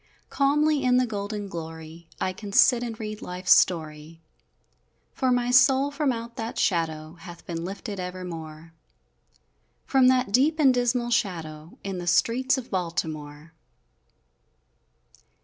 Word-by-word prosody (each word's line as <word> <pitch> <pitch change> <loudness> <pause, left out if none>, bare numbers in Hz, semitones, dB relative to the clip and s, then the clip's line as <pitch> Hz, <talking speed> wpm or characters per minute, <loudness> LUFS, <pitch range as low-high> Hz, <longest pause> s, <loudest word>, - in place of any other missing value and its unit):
Calmly, 295 +1 +2
in 250 -1 +3
the 255 - +3
golden 205 -2 -5
glory, 160 -1 -9
I 185 - -1
can 200 +2 -9
sit 245 +2 +5
and 230 -3 -5
read 215 -1 -6
life's 180 +1 +3
story, 160 -1 -1 0.9
For 260 -5 0
my 245 0 +1
soul 270 +2 +4
from 285 -1 0
out 235 +1 -6
that 225 -1 -5
shadow 160 -3 -1
Hath 170 0 -12
been 165 -1 -5
lifted 195 +2 -6
evermore 165 -3 -7 1.1
From 265 -2 +4
that 255 -4 +2
deep 285 +8 +3
and 275 -5 +5
dismal 245 -1 0
shadow, 165 -7 -3
In 195 -2 -4
the 175 - -7
streets 255 +10 +2
of 255 -2 -7
Baltimore! 160 -3 -4
200 Hz, 130 wpm, -25 LUFS, 165-250 Hz, 1.1 s, sit